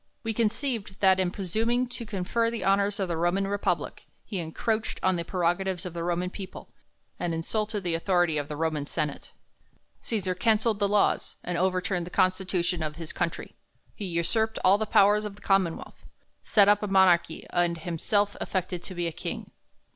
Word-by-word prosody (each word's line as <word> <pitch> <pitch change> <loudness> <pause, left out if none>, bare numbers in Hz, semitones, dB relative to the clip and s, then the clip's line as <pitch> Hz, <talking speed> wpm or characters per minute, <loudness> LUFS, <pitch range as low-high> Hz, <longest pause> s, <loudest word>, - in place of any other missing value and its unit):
We 225 -1 -1
conceived, 225 -2 -1
that, 190 -1 +5
in 185 -1 +2
presuming 220 +7 0
to 240 -2 -5
confer 215 +3 0
the 230 -1 -4
honors 200 +1 +2
of 190 - 0
the 170 -2 -2
Roman 175 +4 +1
Republic, 200 0 -2 0.2
he 195 - -4
encroached 215 +7 -2
on 185 0 +3
the 170 - -2
prerogatives 180 +1 -1
of 180 - -5
the 170 -1 -4
Roman 175 +1 -1
people, 190 -2 -9 0.5
and 170 -2 -1
insulted 210 +5 -2
the 175 -2 -1
authority 175 -2 +2
of 145 - -4
the 150 - -5
Roman 155 -2 -1
senate. 150 -1 -3 0.7
Cesar 195 -5 -1
cancelled 220 +2 +2
the 200 - +2
laws, 205 0 +1
and 180 - -3
over 185 +1 +1
tunied 180 -3 -1
the - - -8
constitution 185 -1 +1
of 155 -1 -3
his 165 -1 -5
country; 170 - -3 0.4
he 205 - -6
usurped 190 +6 0
all 195 +2 +6
the 220 - -1
powers 205 +1 +5
of 210 -2 -5
the 210 - -18
commonwealth, 190 -4 0 0.4
set 205 -2 +4
up 205 0 +5
a 210 - -2
m.onarchy, 185 -4 +3
and 175 -1 +1
liimself 190 +5 0
aflected 185 -2 -2
to 185 - -8
be 175 0 -1
a 165 - -1
king. - - -6
190 Hz, 185 wpm, -27 LUFS, 175-205 Hz, 0.7 s, all